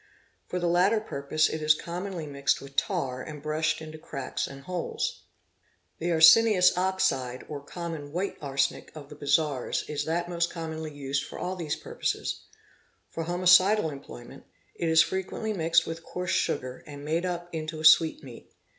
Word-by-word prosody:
For 180 - -3
the 175 - -1
latter 180 +6 +3
purpose 155 -6 0
it 155 - -4
is 155 0 +5
commonly 175 +1 -5
mixed 140 -1 0
with 140 0 -12
tar 135 -10 -1
and 150 +2 -8
brushed 155 +2 -1
into 155 0 -9
cracks 135 -4 -4
and 135 0 -11
holes. 180 0 -3 0.7
The 175 +2 -1
arsenious 180 +4 +7
oxide 180 -9 0
or 145 -2 -6
common 160 -2 -6
white 180 +5 -2
arsenic 135 -1 -1
of 145 -2 -10
the 150 - -10
bazaars 145 -2 0
is 145 -1 -3
that 170 +2 -1
most 170 -1 0
commonly 160 -2 -5
used 140 -1 -2
for: - - -9
ll 180 +1 -3
these 165 -4 -3
purposes—for 165 - -6
homicidal 185 +1 +4
employment, 135 -4 -11 0.3
it 170 - -2
is 160 -1 +6
frequently 190 +3 -3
mixed 165 -2 +3
with 165 0 -5
coarse 180 +1 -4
sugar 130 0 -1
and 145 -1 -9
made 165 +3 0
up 175 -1 -3
into 155 0 -4
a 155 - -4
sweetmeat. 155 -6 +4
160 Hz, 160 wpm, -27 LUFS, 145-175 Hz, 0.7 s, arsenious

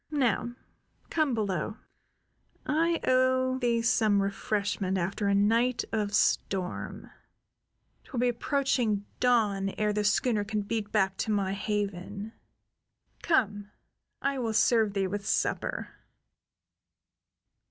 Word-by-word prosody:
Now 245 -5 0 0.6
come 305 -6 +1
below. 205 -1 -2 0.9
I 330 +2 +1
owe 255 0 +2
thee 235 -2 +1
some 220 -4 +3
refreshment 200 -1 -1
after 190 +3 -1
a 200 - +3
night 230 +5 +2
of 210 -2 -1
storm. 185 -3 -1 0.9
'Twill 255 - -5
be 250 - +3
approaching 240 -4 0
dawn 210 -6 +2
ere 210 -1 +1
the 210 0 0
schooner 210 +1 +2
can 210 0 -2
beat 210 0 -3
back 190 0 +1
to 220 - -1
my 195 -2 0
haven. 205 +1 -3 0.9
Come. 205 - +1 0.5
I 275 -1 0
will 230 -3 -1
serve 220 -3 +3
thee 195 -1 +1
with 200 +2 -3
supper." - - -1
215 Hz, 110 wpm, -29 LUFS, 200-245 Hz, 0.9 s, some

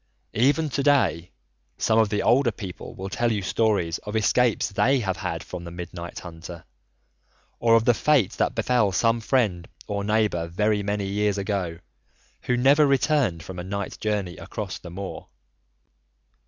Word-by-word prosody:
Even 145 +7 +2
to 140 - 0
day 110 - +2 0.5
some 110 0 +2
of 110 -2 +3
the 105 -1 -1
older 125 -1 +4
people 95 -4 -8
will 95 - -6
tell 120 +4 0
you 105 -3 -1
stories 100 -6 +1
of 105 +1 -7
escapes 115 +2 +2
they 130 +7 +2
have 95 -3 -2
had - - -4
from 90 -1 -7
the 85 - -7
Midnight 85 0 -7
Hunter, 85 -1 -9 1.0
or 115 -1 +4
of 115 0 +3
the 120 - +5
fate 135 -5 +2
that - - -1
befell 120 -6 +2
some 115 +4 +2
friend 105 -8 0 0.2
or 100 -1 -3
neighbour 105 -5 +1
very 105 +4 +1
many 100 0 -2
years 100 +1 0
ago 95 -4 -2 0.7
who 125 - +1
never 140 +4 +5
returned 135 - +1
from 90 0 -8
a - - -4
night 100 +1 -5
journey 100 -5 -2
across 95 +1 -6
the 90 - -10
moor. 95 +3 -7
105 Hz, 165 wpm, -25 LUFS, 90-115 Hz, 1.0 s, the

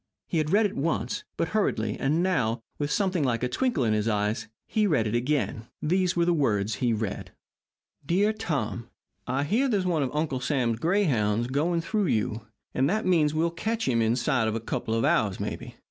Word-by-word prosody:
He 165 - -1
had 155 -1 0
read 210 +5 +4
it 205 - -2
once, 165 +7 -1
but 165 - 0
hurriedly, 110 - 0
and 155 +5 +1
now, 120 -11 0 0.2
with 145 -1 -1
something 185 -1 +1
like 120 -3 0
a - - +2
twinkle 240 - 0
in 110 -2 +2
his 105 +1 0
eyes, 105 0 0 0.2
he 215 -1 +1
read 140 - +2
it 105 - -2
again. 120 -2 -1
These 180 +3 +1
were 170 -1 +2
the 175 - +3
words 110 -8 +1
he 120 -2 +2
read: 110 -2 -3 0.7
DEAR 195 +8 +2
TOM: 135 - -3 0.4
I 130 +3 0
hear 225 - +2
there's 200 -5 +1
one 170 -4 +1
of 135 - 0
Uncle 150 -3 -1
Sam's 120 -3 0
grayhounds 120 - +1
going 165 +5 +1
through 210 +2 0
you, 110 -2 -1 0.3
and 135 +2 +2
that 215 +4 0
means 160 -5 +3
that - - -3
we'll 165 +1 +2
catch 225 +6 -2
him 115 -3 +2
inside 120 +1 +1
of 110 - -1
a - - -1
couple 110 0 -3
of 115 - +1
hours, 100 -3 +2
maybe. - - -5
145 Hz, 205 wpm, -27 LUFS, 115-175 Hz, 0.7 s, read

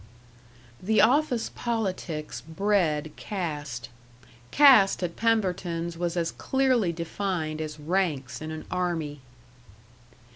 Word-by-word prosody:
The 215 +4 +2
office 265 -2 +3
politics 190 -9 -3
bred 160 -3 0
caste. 145 - -4 0.6
Caste 260 -11 +6
at 170 -1 -3
Pemberton's 180 -6 0
was 175 +1 -2
as 170 -1 0
clearly 255 -8 +1
defined 170 -2 -3
as 155 -1 -6
ranks 155 -6 -1
in 155 - -5
an 155 0 -6
army. 170 -5 -2
175 Hz, 100 wpm, -27 LUFS, 155-205 Hz, 0.6 s, Caste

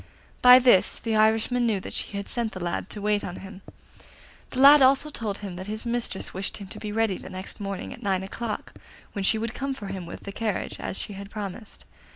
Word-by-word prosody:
By 250 0 +10
this 245 -7 +5
the 225 -1 -2
Irishman 225 +3 +3
knew 210 -4 +1
that - - -8
she 200 - -4
had 200 - -5
sent 235 -2 -2
the 185 - -6
lad 175 +2 -3
to 210 - -7
wait 210 0 +1
on 180 - -5
him. 195 0 -10 0.9
The 255 - -4
lad 285 +2 +9
also 270 +3 +5
told 215 -7 -3
him 195 -4 -7
that 185 +2 -7
his 215 +3 -4
mistress 235 -4 -2
wished 190 +1 -3
him 200 - -8
to - - -8
be 210 - -5
ready 220 -3 0
next 185 +2 -8
morning 200 +2 -5
at 250 - -13
nine 190 -3 0
o'clock, 215 +3 -5 0.4
when 200 - -4
she 220 - +5
would 225 +1 -3
come 275 +1 -3
for 205 -6 -7
him 190 -3 -5
with - - -8
the 200 - -7
carriage, 215 0 -3
as - - -4
she 205 - -5
had 200 0 -8
promised. 205 +1 -7
210 Hz, 225 wpm, -26 LUFS, 195-235 Hz, 0.9 s, By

